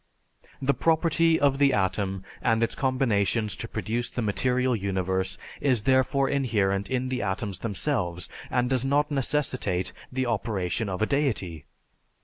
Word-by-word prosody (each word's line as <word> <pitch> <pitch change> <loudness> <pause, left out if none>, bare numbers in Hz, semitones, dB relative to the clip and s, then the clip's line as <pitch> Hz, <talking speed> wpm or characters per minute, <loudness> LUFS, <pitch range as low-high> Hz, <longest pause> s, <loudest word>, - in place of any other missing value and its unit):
The 140 0 +2
property 165 +1 +3
of 140 -1 +2
the 140 -2 +4
atom 95 -1 0 0.2
and 115 0 +2
its 115 - 0
combinations 115 -5 +1
to - - -5
produce 120 +2 -2
the 120 - -3
material 125 +4 +1
universe 95 -1 -1 0.2
is 125 -7 +2
therefore 130 +2 +3
inherent 100 -8 0
in 130 0 -1
the 130 -1 -2
atoms 100 -1 -3
themselves 100 - -1 0.2
and 125 -1 +1
does 130 -1 +1
not 145 +2 +1
necessitate 130 -9 0 0.2
the 130 0 -1
operation 105 -3 -1
of 95 +3 -1
a - - +4
deity. 110 - -1
120 Hz, 140 wpm, -26 LUFS, 100-135 Hz, 0.2 s, the